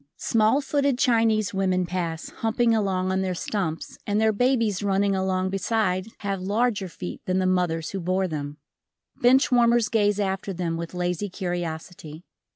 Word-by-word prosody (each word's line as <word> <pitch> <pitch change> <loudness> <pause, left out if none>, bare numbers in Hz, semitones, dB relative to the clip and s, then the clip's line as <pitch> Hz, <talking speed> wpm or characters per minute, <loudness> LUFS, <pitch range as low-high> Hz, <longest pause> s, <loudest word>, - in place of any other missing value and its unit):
Small 225 +5 +2
footed 280 -2 +1
Chinese 225 -5 +2
women 185 -2 +1
pass, 170 -2 -3
humping 230 +1 +1
along 190 -4 0
on 190 0 0
their 185 -1 -1
stumps 170 -4 -3
and 205 +1 +1
their 220 0 +3
babies 230 -3 +1
running 200 0 +1
along 190 0 0
beside 195 -1 0
have 195 -2 -2
larger 205 +1 0
feet 90 - -7
than 185 0 +1
the 185 - +1
mothers 175 -3 0
who 195 - -3
bore 185 +2 0
them, 145 -3 -5 0.6
Bench 260 +3 +4
warmers 240 -2 +4
gaze 205 -2 +2
after 195 0 -2
them 170 -2 -2
with 170 +1 -6
lazy 180 +3 -2
curiosity. 175 -2 -5
190 Hz, 160 wpm, -25 LUFS, 180-220 Hz, 0.6 s, Bench